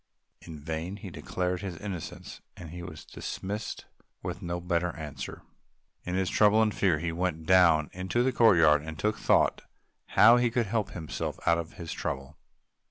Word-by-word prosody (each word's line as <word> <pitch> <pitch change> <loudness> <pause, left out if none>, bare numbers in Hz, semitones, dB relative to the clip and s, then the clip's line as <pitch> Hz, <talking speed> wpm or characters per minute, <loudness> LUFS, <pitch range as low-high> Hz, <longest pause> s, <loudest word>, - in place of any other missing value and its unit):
In 80 -2 -9
vain 80 +5 -4
he 100 - -9
declared 90 0 -3
his 95 -4 -5
innocence; 95 -5 -7 0.2
he 85 +1 -8
was 85 -3 -9
dismissed 105 +3 -5 0.4
with - - -5
no 85 0 -3
better 85 -1 -1
answer. 75 -4 -7 0.6
In 90 - -2
his 95 0 +1
trouble 105 +3 +4
and 110 -1 +3
fear 90 -6 +2
he 85 +2 -2
went 80 -2 -2
down 85 -4 +5
into 95 +7 0
the 130 - +2
courtyard 80 -11 +5
and 80 0 -7
took 105 +5 0
thought - - +3 0.5
how 115 +3 +7
to 120 0 +2
help 105 -1 -1
himself 80 -4 -4
out 85 0 +4
of 85 0 -6
his 85 -2 -6
trouble. 70 +3 -5
90 Hz, 165 wpm, -28 LUFS, 80-100 Hz, 0.6 s, how